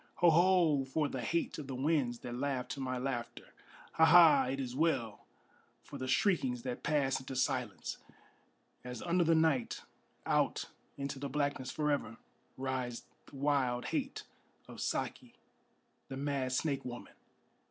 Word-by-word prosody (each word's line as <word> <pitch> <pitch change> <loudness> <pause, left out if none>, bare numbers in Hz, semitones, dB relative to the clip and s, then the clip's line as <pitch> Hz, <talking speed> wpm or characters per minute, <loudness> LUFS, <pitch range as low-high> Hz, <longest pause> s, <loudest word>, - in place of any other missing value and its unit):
Ho! 175 -1 +5
Ho! 170 -4 +4
for 145 +3 -1
the 130 -2 -4
hate 165 +9 -1
of 145 - -7
the 135 - -4
winds 135 -3 0
that 120 - -6
laugh 130 0 -2
to 140 - -5
my 130 -1 -2
laughter! 125 -2 -4 0.4
Ha! 160 - +5
Ha! 165 -1 +8
it 135 +2 -2
is 125 -2 -4
well 135 -8 0 0.6
for 140 - -9
the 130 - -3
shriekings 130 - +1
that 125 -2 -4
pass 145 -3 +1
into 130 0 -7
silence, 125 -5 -1 0.8
As 125 0 -6
under 175 0 +2
the 165 0 +4
night, 160 -6 +1 0.4
out - - +1 0.3
into 140 -1 -4
the 140 0 -4
blackness 140 -3 -1
forever, 145 -6 -1 0.4
Rides 130 -2 -3 0.2
the - - -14
wild 135 -3 +1
hate - - -2 0.4
of - - -9
Saki, - - -3 0.7
the 135 - -6
mad 140 -2 -1
snake 135 +1 0
woman! 120 -1 -8
135 Hz, 150 wpm, -33 LUFS, 125-150 Hz, 0.8 s, Ha